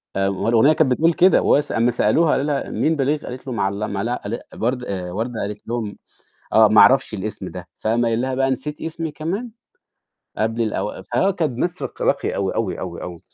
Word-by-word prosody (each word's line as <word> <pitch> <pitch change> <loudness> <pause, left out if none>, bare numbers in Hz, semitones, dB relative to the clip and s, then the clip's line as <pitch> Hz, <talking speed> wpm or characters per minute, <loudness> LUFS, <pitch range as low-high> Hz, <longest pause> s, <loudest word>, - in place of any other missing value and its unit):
آآ، 95 0 +1
ما 100 +3 -1
الأغنية 120 +7 +5
كانت 155 -4 +2
بتقول 165 +6 +3
كده، 185 +3 +5
وس 145 +1 +2
أمّا 115 +2 +2
سألوها 150 +7 +3
قالوا 135 - +1
لها: 145 -2 -1
"مين 160 - +1
باليغ؟" 145 +1 +1
قالت 130 +2 -8
له: 130 - -3
"معل 100 -2 -1
لم" 105 -2 -3
لا 115 +4 -2
أل 110 +4 -3
برد 125 +2 -1
آآ 95 -5 -4
وردة 115 +5 -3
قالت 105 +1 -6
لهم: 115 -3 -3 0.6
"آه، 110 0 +7
ما 105 0 +6
أعرفش 135 -3 +5
الاسم 105 -1 -5
ده." 90 -1 -9
فقام 115 +2 +1
قايل 115 0 +1
لها 130 0 -1
بقى 135 0 +1
"نسيتِ 140 +3 -4
اسمي 160 0 -4
كمان؟" 190 +11 -4 0.9
قبل 115 +2 0
الأو 110 -1 -3
فآه 155 +11 +1
كانت 160 -10 -2
ناس 175 +4 -2
رق - - -5
راقية - - 0
أوي، 95 -1 -1
أوي، 105 -5 -1
أوي، 85 -2 -6
أوي. 85 -2 -7
120 Hz, 210 wpm, -21 LUFS, 105-145 Hz, 0.9 s, آه